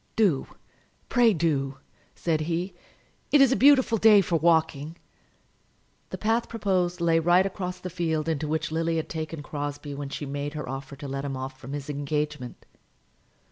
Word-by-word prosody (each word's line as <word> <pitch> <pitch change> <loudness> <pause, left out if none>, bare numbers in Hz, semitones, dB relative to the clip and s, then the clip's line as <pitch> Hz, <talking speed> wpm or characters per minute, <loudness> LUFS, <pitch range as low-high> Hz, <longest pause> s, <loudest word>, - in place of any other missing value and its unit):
"Do, 190 -12 +2 0.6
pray 240 -2 +5
do," 145 -7 0 0.4
said 160 -2 0
he; 170 +4 -2 0.6
"it 295 - +6
is 275 -2 +6
a - - +4
beautiful 260 -5 +5
day 210 -1 +7
for 175 -2 -1
walking." 160 -1 +1 1.1
The - - -5
path 225 +2 0
proposed 185 -5 0
lay 165 -1 +3
right 175 +3 +4
across 185 -2 -4
the 185 - -6
field 160 -3 -1
into 155 -2 -1
which 155 0 -2
Lily 165 +1 0
had 160 - -2
taken 160 -1 -5
Crosbie 145 0 -5
when 140 0 -5
she 145 - -5
made 145 +2 -4
her 150 -3 -5
offer 135 +2 -6
to 140 +1 -8
let 135 0 -4
him 135 -2 -3
off 130 0 -6
from 135 +3 -8
his 145 -1 -5
engagement. 145 -2 -3
160 Hz, 170 wpm, -26 LUFS, 145-180 Hz, 1.1 s, day